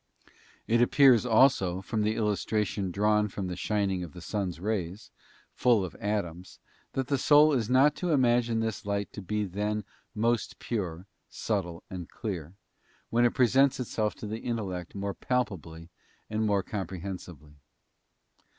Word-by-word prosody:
It 115 Hz, +1 st, +2 dB
appears, 125 Hz, -1 st, +5 dB
also, 110 Hz, -7 st, +4 dB
from 105 Hz, +3 st, -2 dB
the 105 Hz, +1 st, +1 dB
illustration 105 Hz, -2 st, -1 dB
drawn 105 Hz, +3 st, +2 dB
from 100 Hz, -1 st, -5 dB
the 90 Hz, -1 st, -4 dB
shining 100 Hz, -1 st, -1 dB
of 80 Hz, -4 st, -9 dB
the -, -, -9 dB
sun's 90 Hz, -1 st, -3 dB
rays, 95 Hz, -1 st, -3 dB, 0.4 s
full 115 Hz, -6 st, +3 dB
of 90 Hz, -, -8 dB
atoms, 95 Hz, -4 st, -3 dB, 0.4 s
that 135 Hz, -, -1 dB
the 140 Hz, +1 st, 0 dB
soul 150 Hz, +2 st, +6 dB
is 120 Hz, -4 st, 0 dB
not 135 Hz, +3 st, +5 dB
to 180 Hz, -, -2 dB
imagine 120 Hz, -5 st, +3 dB
this 110 Hz, -2 st, -3 dB
light 100 Hz, 0 st, -2 dB
to 105 Hz, -, -7 dB
be 105 Hz, +2 st, -2 dB
then 105 Hz, +3 st, -2 dB, 0.3 s
most 115 Hz, +1 st, 0 dB
pure, 90 Hz, -6 st, -4 dB, 0.2 s
subtile, 85 Hz, 0 st, -3 dB
and 90 Hz, -3 st, -7 dB
clear, 90 Hz, -6 st, -5 dB, 0.6 s
when 120 Hz, +1 st, +4 dB
it 120 Hz, -, +1 dB
presents 130 Hz, +2 st, +4 dB
itself 110 Hz, -3 st, -1 dB
to -, -, -8 dB
the 110 Hz, +2 st, -4 dB
intellect 95 Hz, -8 st, -4 dB
more 100 Hz, 0 st, -3 dB
palpably 85 Hz, -11 st, -3 dB, 0.4 s
and 110 Hz, 0 st, 0 dB
more 100 Hz, -2 st, +2 dB
comprehensibly. 90 Hz, -6 st, -7 dB
105 Hz, 150 wpm, -29 LUFS, 95-115 Hz, 0.6 s, soul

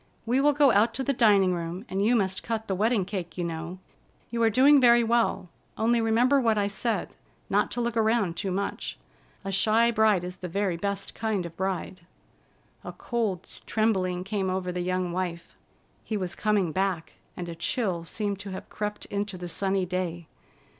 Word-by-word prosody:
We 250 Hz, +4 st, +2 dB
will 295 Hz, +1 st, +4 dB
go 285 Hz, -2 st, +5 dB
out 225 Hz, +2 st, +3 dB
to 265 Hz, -, -1 dB
the 275 Hz, -, +1 dB
dining 200 Hz, -6 st, +4 dB
room, 175 Hz, +4 st, -4 dB
and 195 Hz, -2 st, -1 dB
you 235 Hz, +4 st, +4 dB
must 190 Hz, -4 st, 0 dB
cut 225 Hz, -1 st, -3 dB
the 195 Hz, -, -1 dB
wedding 210 Hz, +1 st, +1 dB
cake, 180 Hz, -4 st, -5 dB
you 175 Hz, -, -1 dB
know. 170 Hz, +1 st, -5 dB, 0.5 s
You 235 Hz, 0 st, -1 dB
are 225 Hz, -, +5 dB
doing 270 Hz, +5 st, +6 dB
very 240 Hz, -1 st, +6 dB
well, 230 Hz, -5 st, +1 dB, 0.3 s
only 230 Hz, +1 st, +2 dB
remember 245 Hz, +5 st, +3 dB
what 225 Hz, -3 st, +2 dB
I 205 Hz, -, +2 dB
said: 220 Hz, +3 st, -2 dB, 0.4 s
not -, -, +2 dB
to 245 Hz, -, -2 dB
look 235 Hz, -1 st, -1 dB
around 220 Hz, -5 st, +2 dB
too 195 Hz, -, -3 dB
much. 195 Hz, +2 st, -3 dB, 0.5 s
A 195 Hz, -, -2 dB
shy 225 Hz, +4 st, +3 dB
bride 215 Hz, -5 st, +3 dB
is 180 Hz, 0 st, -6 dB
the 180 Hz, -, -6 dB
very 190 Hz, 0 st, -1 dB
best 200 Hz, +3 st, -3 dB
kind 215 Hz, -5 st, -2 dB
of 170 Hz, -, -8 dB
bride." 190 Hz, -1 st, -3 dB, 0.8 s
A -, -, -7 dB
cold 215 Hz, -7 st, -2 dB, 0.2 s
trembling 190 Hz, -5 st, +1 dB
came 195 Hz, -1 st, -2 dB
over 185 Hz, -1 st, -2 dB
the 180 Hz, 0 st, -3 dB
young 185 Hz, 0 st, -1 dB
wife. 175 Hz, -1 st, -4 dB, 0.5 s
He 215 Hz, -, -3 dB
was 185 Hz, -3 st, -3 dB
coming 205 Hz, -5 st, +1 dB
back, 185 Hz, -2 st, -1 dB, 0.2 s
and 175 Hz, -, -5 dB
a 170 Hz, -, -5 dB
chill 180 Hz, -1 st, -1 dB
seemed 200 Hz, +3 st, -3 dB
to 205 Hz, -, -7 dB
have 190 Hz, -, -7 dB
crept 210 Hz, 0 st, -4 dB
into 200 Hz, -1 st, -3 dB
the 175 Hz, 0 st, -6 dB
sunny 190 Hz, +2 st, 0 dB
day. 175 Hz, -2 st, -3 dB
200 Hz, 190 wpm, -27 LUFS, 180-225 Hz, 0.8 s, doing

